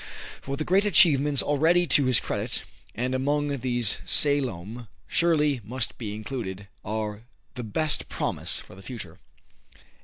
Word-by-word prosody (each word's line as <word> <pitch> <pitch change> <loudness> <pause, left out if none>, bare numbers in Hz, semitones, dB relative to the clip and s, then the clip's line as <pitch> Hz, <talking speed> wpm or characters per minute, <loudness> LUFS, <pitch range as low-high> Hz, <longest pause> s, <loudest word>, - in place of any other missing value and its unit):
For 140 +1 -5
the 155 - -3
great 190 +3 +3
achievements 145 -7 +5
already 160 +5 +3
to 140 -2 +4
his 130 -2 +4
credit, - - -3 0.3
and 125 +3 -2
among 145 +2 0
these 120 -4 0
"Salome" 120 - +1 0.2
surely 150 -6 +2
must 120 +3 -3
be 105 -3 -5
included, 105 -5 -6 0.2
are 110 +1 -4 0.3
the 125 - -6
best 145 +8 -1
promise - - -2
for - - -13
the 95 - -13
future. 95 -6 -8
130 Hz, 135 wpm, -26 LUFS, 110-145 Hz, 0.3 s, achievements